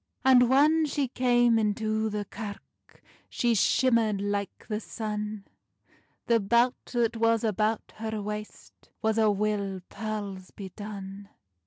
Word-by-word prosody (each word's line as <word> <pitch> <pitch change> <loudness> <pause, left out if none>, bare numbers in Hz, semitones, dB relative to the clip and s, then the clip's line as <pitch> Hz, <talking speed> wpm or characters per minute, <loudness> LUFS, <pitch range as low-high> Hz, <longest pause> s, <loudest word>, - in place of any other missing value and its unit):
And 250 -2 +6
whan 305 +4 +4
she 285 -1 -1
cam 240 -2 +3
into 215 +1 0
the 210 -1 -3
kirk, 205 -2 -10 0.3
She 240 -1 +1
shimmerd 230 -1 +2
like 200 0 -3
the 210 -2 -2
sun; 210 -2 -5 0.8
The 235 -1 +3
belt 235 +5 +3 0.2
that 235 -1 +1
was 230 0 +2
about 215 0 -1
her 220 0 -3
waist 210 +1 -8
Was 220 0 +2
a' 220 -1 +4
wi 200 -2 -1
pearles 205 -4 -5
bedone. 200 0 -8
215 Hz, 125 wpm, -28 LUFS, 205-235 Hz, 0.8 s, And